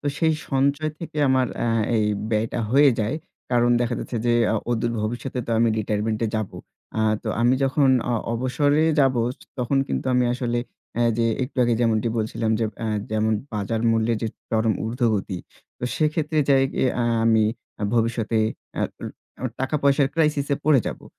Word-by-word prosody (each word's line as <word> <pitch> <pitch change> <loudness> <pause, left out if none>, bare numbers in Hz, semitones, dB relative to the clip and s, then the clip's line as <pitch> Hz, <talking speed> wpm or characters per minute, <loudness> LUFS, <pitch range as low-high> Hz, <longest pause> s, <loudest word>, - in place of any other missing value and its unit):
তো 145 - -6
সেই 160 -1 +3 0.2
সঞ্চয় 140 +3 +1
থেকে 165 -2 -8
আমার 130 -1 +3
অ্যা 120 - 0 0.3
এই 110 - +2 0.3
ব্যয়টা 110 +2 0
হয়ে 140 +1 +6
যায়। 110 +8 -1 0.3
কারণ 120 -1 +3
দেখা 120 - 0
যাচ্ছে 120 - -5
যে 120 - +3 0.2
অ - - +2
অদূর 115 0 0
ভবিষ্যতে 120 +4 -3
তো - - -4
আমি 115 0 +4
রিটায়ারমেন্টে 110 +1 -1
যাবো। 110 -3 -4 0.4
আ - - +2 0.2
তো - - -4
আমি 120 +2 +4
যখন 135 +1 +3 0.2
অ - - +2 0.2
অবসরে 145 +5 +1 0.2
যাবো 130 -3 +3
য - - -4 0.3
তখন 130 +3 +1
কিন্তু - - -2
আমি 125 0 +3
আসলে 120 -1 -1 0.4
অ্যা 120 - 0 0.2
যে 115 - +2 0.2
একটু 130 +2 -5
আগে 120 -1 +2
যেমনটি 115 -1 +2
বলছিলাম 110 0 -1 0.3
অ্যা 110 - -2 0.2
যেমন 110 0 +1 0.2
বাজার 105 +2 -2
মূল্যের 115 0 +1
যে 110 - 0 0.2
চরম 110 0 +2
ঊর্ধ্বগতি। 110 -5 -1 0.4
তো - - -4
সেক্ষেত্রে 155 0 0
যাই 135 -1 +5 0.3
অ্যা 120 - 0
আ - - +1 0.2
আমি 110 -1 +4 0.5
ভবিষ্যতে 115 -1 +1 0.4
এ্যা - - -1 0.6
অ - - +1
টাকা 130 +3 0
পয়সার 140 -1 +4
ক্রাইসিসে 150 -3 +1
পড়ে 150 -5 +5
যাবো। - - -5
120 Hz, 170 wpm, -23 LUFS, 110-135 Hz, 0.6 s, হয়ে